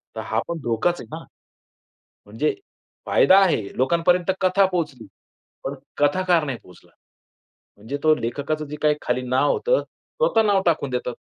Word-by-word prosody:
तर - - -5
हा - - -1
पण 170 -1 -4
धोकाच 120 +10 0
आहे - - -11
ना? 165 - -9 1.0
म्हणजे 430 - -1 0.5
फायदा 190 +1 +6
आहे. 170 -11 +2 0.2
लोकांपर्यंत 170 +7 +2
कथा 190 +1 +4
पोहोचली, 150 -10 -3 0.6
पण 135 - -3 0.2
कथाकार 170 +3 +2
नाही 135 -4 -3
पोहचला. 90 - -18 0.9
म्हणजे 110 +8 -5
तो 155 - +5
लेखकाचं 145 +6 -3
जे 150 - -6
काही 150 -1 +3
खाली 130 - -1
नाव 130 +3 +2
होतं, - - +1 0.4
स्वतः 230 - +3
नाव 200 -2 +3
टाकून 155 -5 +1
देतात. 125 -1 -3
155 Hz, 150 wpm, -22 LUFS, 130-180 Hz, 1.0 s, फायदा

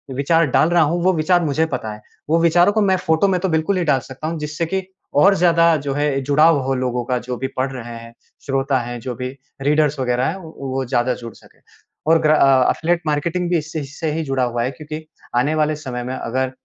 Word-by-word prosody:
विचार 165 +5 +2
डाल 155 - +4
रहा 175 0 +4
हूँ, 170 +4 0
वो 185 - +4
विचार 175 +2 +2
मुझे 155 +2 +1
पता 125 -8 -4
है। 105 - -12 0.3
वो 165 +2 +3
विचारों 175 +3 +4
को 215 - +2
मैं 190 -2 +3
फ़ोटो 160 +3 +2
में 185 -2 +1
तो 190 - 0
बिल्कुल 160 +4 +1
ही 180 - 0
डाल 140 -4 +3
सकता 130 +4 -8
हूँ 165 0 -3
जिससे 150 +2 -3
कि 190 +4 -2 0.4
और 200 +3 +6
ज़्यादा 170 -2 +4
जो 140 - -1
है 145 -1 0
जुड़ाव 150 +4 +4
हो 135 +1 0
लोगों 125 -1 -1
का 125 +1 0
जो 125 0 -5
भी 130 - -3
पढ़ 130 +1 0
रहे 120 -2 -7
हैं 115 0 -12 0.3
श्रोता 135 -1 0
हैं, 120 0 -5
जो 125 +1 -5
भी 125 +1 -4 0.3
रीडर्स 150 0 +2
वग़ैरह 125 0 0
हैं - - -2
वो 135 -4 -5
ज़्यादा 120 +1 +1
जुड़ 115 -2 -8
सकें। - - -21 0.5
और 165 +1 +5
ग्रा 155 0 +4
अ, 135 -3 +4
एफ़िलिएट 170 +1 0
मार्केटिंग 170 +4 -1
भी 175 - +2
इससे 155 0 -4
इससे 150 +4 -6
से - - 0
ही 165 - -1
जुड़ा 135 -3 -1
हुआ 120 -1 -1
है 125 - -1
क्योंकि 155 +2 -8 0.3
आने 145 +6 +2
वाले 155 0 +1
समय 130 -5 -6
में 130 +1 -4
अगर 130 +2 -2
150 Hz, 240 wpm, -20 LUFS, 130-165 Hz, 0.5 s, और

